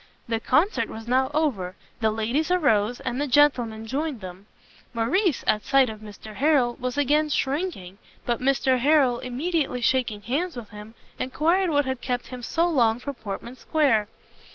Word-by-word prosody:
The 225 -1 -1
Concert 340 - +1
was 225 +1 -9
now 260 +2 +2
over; 245 - -1 0.2
the 220 -1 +2
ladies 230 +9 -1
arose, 245 - +2
and 250 +4 -3
the 290 - 0
gentlemen 245 -5 +2
joined 280 +2 -3
them. 185 +1 -10 0.5
Morrice, 290 - +1
at 210 - +1
sight 270 -4 +3
of 215 - -10
Mr 215 0 -11
Harrel, 270 -5 +3
was 250 +1 -3
again 295 +2 +2
shrinking; 270 - -2 0.3
but 240 0 -1
Mr 265 -1 +2
Harrel, 265 -3 +3
immediately 275 +1 -2
shaking 240 -4 0
hands 315 - -2
with 225 -4 -8
him, 210 +2 -11 0.2
enquired 335 +8 +1
what 290 -2 +2
had 260 -1 -3
kept 250 -1 -3
him 255 -1 -7
so 330 +8 0
long 235 -9 +2
from 280 +3 -6
Portman 225 +1 -7
Square? 260 -11 +1
255 Hz, 165 wpm, -25 LUFS, 225-295 Hz, 0.5 s, sight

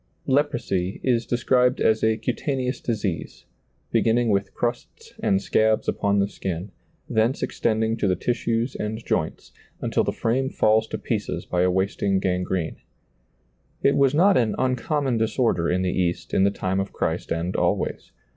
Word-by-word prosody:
Leprosy 120 -10 0
is 120 -2 +1
described 125 +1 +2
as 110 0 +2
a 110 0 +3
cutaneous 130 0 -2
disease, 105 -7 -3 0.5
beginning 115 +1 +2
with 100 -1 +1
crusts 120 0 -4
and 95 - +2
scabs 110 0 +2
upon 100 0 +1
the 100 0 +2
skin, 95 -1 -5 0.4
thence 115 +4 +1
extending 110 0 0
to 110 -3 0
the 90 - +2
tissues 120 +2 -1
and 110 +2 -4
joints, - - -2 0.3
until - - 0
the - - 0
frame 130 +4 0
falls 110 -2 +2
to - - -4
pieces - - -3
by 90 - 0
a 90 - +3
wasting 95 +1 0
gangrene. 90 -2 -1 1.1
It 140 - +4
was 140 0 +3
not 190 +4 +5
an 115 -3 +1
uncommon 130 0 0
disorder 110 -6 +1
in 90 +1 +1
the 90 - 0
East 90 -2 -1
in 95 - +4
the - - +4
time 95 -1 -2
of 95 0 -3
Christ - - -2
and 85 +2 -1
always. - - -1
110 Hz, 155 wpm, -24 LUFS, 95-125 Hz, 1.1 s, not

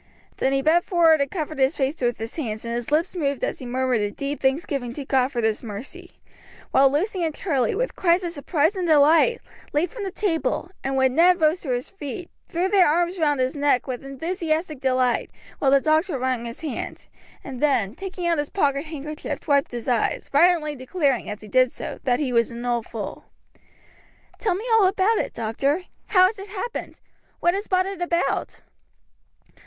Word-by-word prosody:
Then 265 - +1
he 270 0 +1
bent 335 +4 +4
forward 330 -4 +4
and 280 - 0
covered 310 -3 -4
his 265 +3 +2
face 275 +2 -1
with 240 -1 +1
his 225 +1 -6
hands, 225 -8 -4
and 235 - -3
his 240 +3 -4
lips 330 +5 +1
moved 280 -6 -1
as - - -2
he 255 - -7
murmured 255 -2 0
a 205 - 0
deep 280 +7 -4
thanksgiving 265 -3 -1
to 280 +1 -6
God 260 -1 +2
for 240 -3 -2
this 220 -1 0
mercy, 265 - -8 0.6
while 270 0 +5
Lucy 360 +5 0
and 315 -2 -1
Charlie, 280 -8 0
with - - -2
cries 350 0 +2
of 345 - -2
surprise 310 +3 0
and 365 -2 -2
delight, 320 +9 +5 0.3
leaped 330 +8 0
from 460 -4 -6
the 390 - -2
table, 360 -2 -1
and 270 0 -1
when 265 -1 +3
Ned 350 +4 +5
rose 315 +3 +2
to 290 - -7
his 245 0 -1
feet, 345 -1 -7 0.2
threw 355 +1 0
their 385 -2 +5
arms 345 +3 +1
round 295 -3 +2
his 255 +3 0
neck 285 -4 +2
with 255 -2 -5
enthusiastic 315 +2 -2
delight; 255 -2 +1 0.3
while 275 - +3
the 275 +1 +6
doctor 310 +2 +1
wrung 255 -2 -1
his 235 0 -7
hand, 305 -5 -5 0.4
and 260 -3 -7
then, 245 -9 +2
taking 370 +3 -6
out 335 -2 +2
his 290 - -2
pocket 280 -5 0
handkerchief, 305 +1 -6
wiped 280 -2 +3
his 240 -2 -6
eyes, 245 -3 0
violently 305 0 +3
declaring, 275 -1 -1
as 210 0 -6
he 215 - -11
did 255 +3 +3
so, - - -7
that 245 -2 +2
he 270 -5 -1
was 230 -1 +3
an 235 +1 -7
old 240 -2 -1
fool. - - -6 1.1
"Tell 405 -6 +1
me 415 +5 -5
all 435 -4 +6
about 390 +4 +2
it, - - -2
doctor. 275 +9 -1 0.2
How 370 -3 +6
has 400 +2 -1
it 395 +1 -8
happened? 420 +4 -5 0.4
What 345 - +3
has 400 +2 -3
brought 370 0 +2
it 390 -2 -6
about?" 350 0 -1
295 Hz, 200 wpm, -24 LUFS, 255-350 Hz, 1.1 s, the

